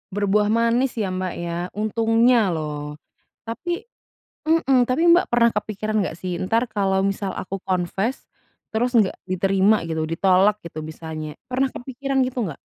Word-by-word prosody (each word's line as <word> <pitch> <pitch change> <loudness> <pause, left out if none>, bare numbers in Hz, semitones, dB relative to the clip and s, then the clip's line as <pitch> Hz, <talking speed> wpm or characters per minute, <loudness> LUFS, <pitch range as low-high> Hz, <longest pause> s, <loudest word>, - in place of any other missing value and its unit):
Berbuah 205 +1 +2
manis 235 +3 +2
ya, 200 -3 0
Mbak, 185 -1 -2
ya, 170 0 -3 0.2
untungnya 225 0 +3
loh. 150 -1 -4 0.5
Tapi 345 - -3 0.6
hmm, 275 -6 +4
tapi 255 +6 +1
Mbak 355 - +3
pernah 235 -1 +5
kepikiran 215 +1 -2
nggak 185 - -4
sih? 180 -2 -3
Entar 230 +6 +1
kalau 195 -2 +1
misal 195 0 -2
aku 195 +1 -5
confess, 190 +6 -1 0.5
terus 245 +3 +1
nggak 205 -4 +3
diterima 195 +2 +2
gitu, 160 -1 -2
ditolak, 190 +4 +3
gitu 155 -2 -7
misalnya. 155 -1 -7
Pernah 260 +1 +1
kepikiran 270 +2 -3
gitu 255 -1 -3
nggak? 150 - -6
205 Hz, 145 wpm, -22 LUFS, 185-240 Hz, 0.6 s, pernah